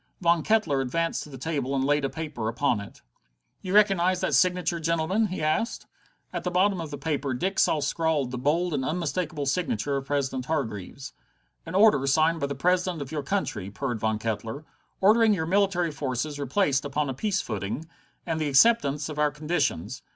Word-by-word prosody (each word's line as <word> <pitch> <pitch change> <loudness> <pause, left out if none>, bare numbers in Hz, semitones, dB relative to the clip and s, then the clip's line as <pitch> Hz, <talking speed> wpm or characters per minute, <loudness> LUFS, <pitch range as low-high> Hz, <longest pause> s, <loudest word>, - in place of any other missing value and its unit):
Von 170 -2 +3
Kettler 165 -10 +2
advanced 165 +6 -1
to - - -9
the 135 - -9
table 140 -1 -2
and 135 - +1
laid 145 +1 +2
a 135 - 0
paper 150 -9 -5
upon 120 0 +1
it. 100 - -11 0.6
"You 185 +1 -2
recognize 185 -3 +4
that - - 0
signature, 180 -1 +2
gentlemen?" 170 +6 +1
he 185 -4 -4
asked. 155 +10 -1 0.5
At - - -3
the 180 - -1
bottom 185 +1 +2
of 160 - -6
the 145 - -6
paper 140 -2 -2
Dick 190 +9 -1
saw 155 - +3
scrawled 150 -3 0
the 125 - -4
bold 165 +6 +1
and 135 -2 -1
unmistakable 165 0 -2
signature 140 -3 -1
of 135 0 -6
President 135 -3 -1
Hargreaves. 135 - -4 0.5
"An 165 - -5
order 195 -10 +5
signed 160 +4 +3
by 140 - -1
the 140 - -4
President 180 +3 +1
of 140 -2 -6
your 155 -2 -2
country," 130 - -2
purred 120 +2 -3
Von 110 0 0
Kettler, 115 +6 -4 0.4
"ordering 215 +2 +5
your 160 -3 -2
military 185 -2 +1
forces 145 +1 -3
replaced 140 0 +1
upon 145 +1 -1
a 135 - -2
peace 200 - -1
footing, 105 - -4 0.4
and 165 -2 -2
the 150 - 0
acceptance 145 -3 +4
of 150 -1 -6
our 150 0 +3
conditions. 145 - -2
150 Hz, 190 wpm, -26 LUFS, 135-180 Hz, 0.6 s, order